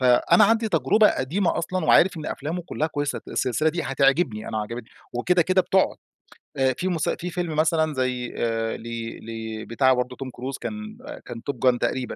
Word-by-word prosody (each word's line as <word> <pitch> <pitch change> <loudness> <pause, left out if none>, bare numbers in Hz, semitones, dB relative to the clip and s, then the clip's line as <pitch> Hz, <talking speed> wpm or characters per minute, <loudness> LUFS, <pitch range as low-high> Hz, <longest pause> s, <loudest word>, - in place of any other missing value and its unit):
فأنا 130 +7 +5
عندي 225 +1 +2
تجربة 215 +1 +4
قديمة 165 +8 0
أصلًا 180 0 -2
وعارف 185 +1 +5
إن 155 - -6
أفلامه 165 +5 -4
كلّها 155 -2 -2
كويّسة، 145 -2 -2
ت - - -15
السلسلة 130 +5 +1
دي 170 +1 -2
هتعجبني 135 -4 +1
أنا 110 - -2
عجبتني، 115 +2 -7 0.2
وكده 175 +9 +2
كده 185 +2 +3
بتقعد. 190 0 +2 0.6
آآ 130 -1 +3
في 185 - -2
مس 165 -4 0
في 180 - -3
فيلم 170 -3 -3
مثلًا 155 0 +2
زي 125 -2 -2
آآ 115 -1 -1
لي 115 0 -6
لي 110 -1 -6
بتاع 130 +3 +3
برضو 125 0 -2
توم 135 0 -6
كروز 130 +2 -6
كان 215 0 -6 0.3
كان 115 - -7
Top - - -14
gun 125 0 +3
تقريبًا، 130 -1 -2
135 Hz, 190 wpm, -24 LUFS, 120-175 Hz, 0.6 s, فأنا